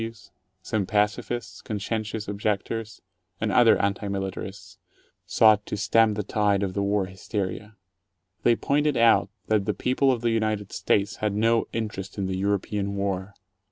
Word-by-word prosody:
W. 115 - -2
Ws., 115 -5 -18 0.3
some 105 -2 -1
pacifists, 105 +2 -1
conscientious 110 +1 -3
objectors, 105 +2 -3 0.4
and 110 -1 0
other 115 +2 +6
anti 100 +1 -1
militarists 95 -1 -5 0.2
— - - -39
sought 110 -2 +5
to - - -3
stem 115 0 +3
the 105 - -2
tide 100 -1 +1
of 95 -2 -2
the 100 - -1
war 100 0 +1
hysteria. 100 +2 -5 0.7
They 120 - +4
pointed 145 +3 +1
out 115 -3 +4 0.2
that 105 -3 +1
the - - -1
people 130 +2 +2
of 120 -3 -1
the 120 -1 +1
United 110 -3 -1
States 100 +2 0
had 105 -2 -1
no 115 +2 +2
interest 105 -4 -4
in 100 - -1
the 95 0 -2
European 100 +1 -1
War. 100 0 -3
105 Hz, 160 wpm, -25 LUFS, 100-115 Hz, 0.7 s, other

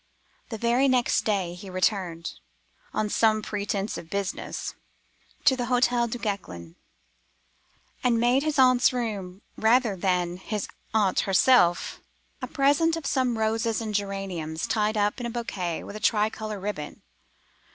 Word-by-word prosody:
The 225 - -4
very 235 +4 +2
next 250 -2 +2
day 195 -5 0
he 185 +2 -10
returned—on 170 - -3
some 215 0 +2
pretence 205 -1 -3
of 160 - -12
business—to 200 +6 -3
the 245 -1 -2
Hotel 245 -1 +2
Duguesclin, 195 - -5 1.3
and 235 -2 +3
made 245 +3 +3
his 305 0 -1
aunt's 255 -1 +5
room, 205 -6 -4
rather 225 -1 +3
than 180 -1 0
his 205 +2 -4 0.2
aunt 210 -4 +2
herself, 185 -4 +4 0.4
a - - -3
present 290 +4 +2
of 305 -4 -5 0.3
roses 220 0 0
and 220 -2 -4
geraniums 195 -6 -3
tied 215 0 0
up 205 +3 +1
in 240 - -3
a - - -4
bouquet 195 -8 -3
with 200 - -9
a - - -5
tricolor 215 -1 0
ribbon. 190 -7 -5
210 Hz, 130 wpm, -26 LUFS, 185-235 Hz, 1.3 s, aunt's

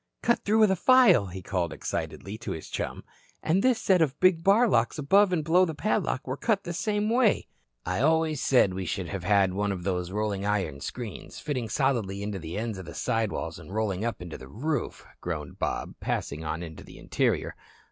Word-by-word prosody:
"Cut 235 - +2
through 215 +2 +2
with 215 -3 +5
a - - +3
file," 190 - +5
he 95 +1 -8
called 90 -4 -1
excitedly 100 +2 -4
to 120 - -4
his 80 - -8
chum. - - -4 0.4
"And 180 +5 +2
this 255 0 +3
set 185 -3 +3
of 150 -2 +1
big 185 -3 +4
bar 210 +6 +5
locks 120 - +2
above 195 +7 +4
and 165 -4 0
below 170 +4 +4
the 160 -4 -1
padlock 195 -6 -1
were 130 +1 -3
cut 200 +5 0
the 175 - -4
same 210 +3 -1
way." 230 -1 +3 0.4
"I 90 +3 -1
always 160 -1 +2
said 125 -10 +4
we 95 -1 -4
should 95 -2 -3
have 100 -3 -4
had 100 -1 +3
one 100 +1 0
of 90 -3 -4
those 90 -2 -1
rolling 100 0 -2
iron 95 -9 -1
screens, 120 - -7
fitting 130 -7 -3
solidly 115 -8 0
into 100 -2 -4
the 85 +2 -6
ends 110 -3 -3
of 95 - -8
the 85 - -9
side 115 -2 0
walls - - -4
and - - -12
rolling 105 -2 -1
up 115 -6 -3
into 85 -3 -8
the 65 - -11
roof," 135 - -3 0.2
groaned - - -5
Bob, - - -2
passing 75 +3 -3
on 80 +2 -3
into 80 -2 -9
the - - -13
interior. - - -1
115 Hz, 210 wpm, -27 LUFS, -, 0.4 s, with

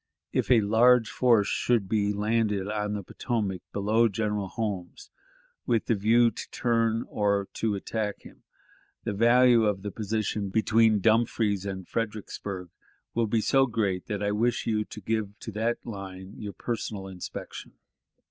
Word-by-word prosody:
"... - - -55
If - - 0
a 120 -3 +6
large 115 +3 +4
force 115 -5 +3
should 115 -5 +1
be 105 0 +1
landed 105 -1 0
on 105 0 -2
the 100 - -4
Potomac 100 -3 -3
below 110 +3 +2
General 105 -1 -2
Holmes, 100 -4 -5 0.6
with 115 -2 +1
the - - +2
view 115 +3 +4
to - - -8
turn 115 -1 0
or 100 -1 0
to 110 -2 -1
attack 105 +1 -3
him, - - -15 0.6
the - - -2
value 120 +2 +5
of 100 -2 0
the 105 - -4
position 105 -1 -2
between 110 +1 +3
Dumfries 110 -2 +2
and 95 -2 -5
Fredericksburg 105 -4 -4 0.4
will 115 -1 +1
be 110 +1 +1
so 135 +3 +3
great 100 -6 -1
that 105 -1 -3
I 105 - +1
wish 115 +3 0
you 105 -2 0
to 105 - -10
give 105 0 -2
to 110 - -7
that 115 +3 -2
line 95 -3 -8
your 105 -2 -7
personal 105 -2 -4
inspection. 95 -2 -8
105 Hz, 155 wpm, -27 LUFS, 100-115 Hz, 0.6 s, a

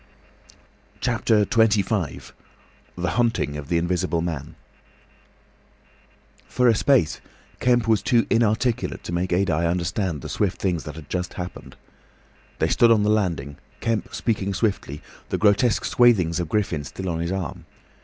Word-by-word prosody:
CHAPTER 105 -2 +2
XXV. 110 - +1 0.7
THE 90 0 -1
HUNTING 115 - 0
OF 75 -1 -6
THE 85 - +2
INVISIBLE 85 0 0
MAN 80 -6 -5 1.9
For 125 - +2
a 115 - +6
space 125 - +2 0.4
Kemp 120 -2 +2
was 110 -3 +3
too 115 +3 +2
inarticulate 115 +1 +1
to - - -6
make 90 +1 -1
Adye 85 -3 +1
understand 85 -2 -2
the - - -7
swift 100 -3 -1
things 90 -5 -1
that 75 - -7
had 80 -3 -10
just 90 +2 -4
happened. 90 0 -7 0.8
They - - +1
stood 120 - +4
on 110 -2 +4
the 105 - +2
landing, 85 -10 -1 0.2
Kemp 115 -2 -2
speaking 100 -4 -1
swiftly, 95 - -2 0.3
the - - -1
grotesque 105 +3 +3
swathings 95 -9 +3
of 85 -3 -3
Griffin 90 -8 -1
still 95 +6 -7
on 85 -2 -2
his 85 +1 -2
arm. 95 -2 -4
95 Hz, 145 wpm, -23 LUFS, 85-110 Hz, 1.9 s, a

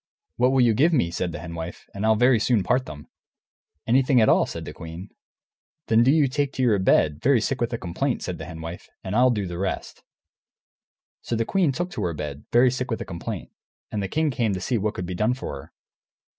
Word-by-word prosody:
"What 125 +1 +3
will 135 -1 +3
you 120 -2 +4
give 155 +10 +3
me," 85 - +2
said 90 0 -2
the - - -6
Hen 85 -1 -8
Wife, 85 +1 -7
"and 100 - -5
I'll 110 - +5
very 120 +1 +4
soon 110 -2 +2
part 125 +7 +1
them?" 75 -1 -9 0.8
"Anything 130 +2 +4
at 110 - +4
all," - - +4
said - - -6
the - - -7
queen. 85 +4 -9 0.8
"Then 115 0 +5
do 120 - +4
you 150 0 +4
take 140 +1 -1
to 130 - -1
your 110 -5 +3
bed, 80 -5 +2
very 135 -1 +4
sick 130 +4 -2
with 120 - 0
a 115 - -2
complaint," 115 +9 -2
said 90 -3 -4
the 80 - -6
Hen 80 -1 -8
Wife, 85 +2 -8
"and 95 +2 -4
I'll 125 +2 +5
do 105 -5 0
the 90 -1 -6
rest." 95 0 -4 1.2
So 120 - -3
the 115 0 0
queen 180 - +2
took 175 +6 -3
to 110 - -5
her 85 -2 -2
bed, 75 -1 -6
very 125 +1 +5
sick 130 0 -3
with 115 - -2
a - - -4
complaint, 85 -2 -6 0.4
and 105 - -2
the 100 - -2
king 155 +8 0
came 115 -5 0
to - - -3
see 110 +6 -1
what 105 +1 -2
could 90 - -4
be 90 - -5
done 110 +7 +1
for 130 - -6
her. 70 - -11
110 Hz, 240 wpm, -24 LUFS, 90-130 Hz, 1.2 s, I'll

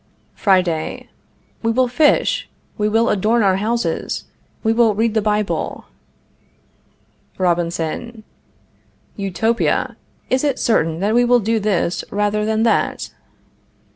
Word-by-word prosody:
Friday. 180 -5 0 0.5
We 230 - 0
will 255 +2 +2
fish. 290 +5 +2 0.3
We 210 0 0
will 225 +2 +2
adorn 220 +3 +2
our 190 -1 +3
houses. 230 +4 -2 0.4
We 225 -1 +2
will 225 -2 +3
read 225 +1 +1
the 220 - +2
Bible. 210 0 -1 1.5
Robinson. 175 +5 -2 0.9
Utopia! 215 +4 0 0.3
Is 260 +2 +1
it 285 -3 +1
certain 165 -7 +1
that 205 +2 +1
we 240 +1 +4
will 245 0 +4
do 225 +1 0
this 195 -4 0
rather 210 +1 0
than 220 0 +1
that? 230 - 0
215 Hz, 115 wpm, -19 LUFS, 195-230 Hz, 1.5 s, we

